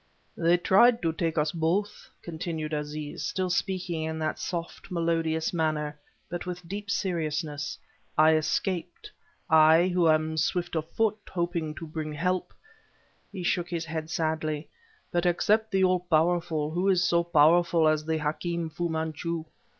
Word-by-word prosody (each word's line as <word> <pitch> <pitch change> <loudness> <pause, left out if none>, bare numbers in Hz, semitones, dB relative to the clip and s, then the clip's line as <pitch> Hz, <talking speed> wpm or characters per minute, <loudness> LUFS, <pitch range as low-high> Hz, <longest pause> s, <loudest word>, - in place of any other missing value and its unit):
"They 170 +1 +3
tried 230 +6 +4
to 165 -1 +1
take 165 0 -2
us 150 0 +2
both," 180 +6 -1
continued 160 -2 -4
Aziz 150 0 -4
still 185 -1 -1
speaking 180 -3 -1
in 160 0 -3
that 155 -1 -2
soft, 170 +1 -5
melodious 165 -2 0
manner, 155 -3 -1 0.3
but 175 0 -5
with 180 -1 -6
deep 200 +2 -6
seriousness. 155 -6 -2 0.4
"I 155 +1 +6
escaped, 175 - -2 0.4
I, 160 +2 +6
who 175 -2 +3
am 155 0 +2
swift 175 +2 0
of 160 0 -2
foot, 220 +1 0
hoping 170 -3 -2
to 165 - -7
bring 155 -1 -5
help." 180 +4 -1 0.8
He 190 -3 -6
shook 175 0 0
his 170 -1 -3
head 160 -1 -4
sadly 155 -2 -2 0.4
"But, 175 0 +1
except 215 +5 +2
the 190 -1 +2
All 185 -1 +3
Powerful, 165 -2 +1
who 180 +4 0
is 180 -2 +3
so 170 0 +3
powerful 170 0 +4
as 155 0 +2
the 160 +1 -1
Hakim 160 +2 -2
Fu 170 +2 -2
Manchu? 160 +1 -3
165 Hz, 150 wpm, -27 LUFS, 155-180 Hz, 0.8 s, I